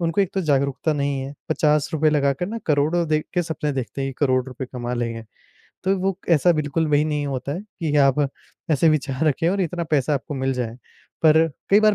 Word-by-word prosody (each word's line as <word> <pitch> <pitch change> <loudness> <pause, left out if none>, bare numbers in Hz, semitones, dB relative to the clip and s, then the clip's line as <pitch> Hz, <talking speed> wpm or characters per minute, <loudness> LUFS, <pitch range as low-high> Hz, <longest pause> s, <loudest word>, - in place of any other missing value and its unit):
उनको 170 +3 +1
एक 195 - +1
तो 195 - +1
जागरूकता 140 -1 +1
नहीं 140 -2 -1
है, 135 +2 -6
₹50 155 0 +2
लगा 140 -2 +2
कर 175 +6 -4
ना, 230 +3 -4
करोड़ों 155 +3 +2
दे 155 0 +2
के 175 - +2
सपने 150 -3 -3
देखते 135 +1 -4
हैं 135 - -2
कि - - -11
करोड़ 130 -1 +2
रुपए 130 0 -6
कमा 125 0 -3
लेंगे। 115 -1 -3 0.6
तो 195 +1 +2
वो 190 0 -1 0.2
ऐसा 175 +4 +4
बिल्कुल 155 +1 0
वही 145 0 +4
नहीं 150 -2 -1
होता 135 0 -3
है 175 - -4
कि 165 -8 -3
आप 140 0 +4 0.5
ऐसे 155 +2 +4
विचार 145 -2 0
रखें 165 +4 +1
और 195 +2 0
इतना 175 -1 -1
पैसा 145 -1 +2
आपको 140 +1 -4
मिल 135 0 0
जाए। 120 -3 -3 0.5
पर 160 +1 +6 0.2
कई 205 - +7
बार 215 -1 +5
150 Hz, 215 wpm, -22 LUFS, 135-165 Hz, 0.6 s, कई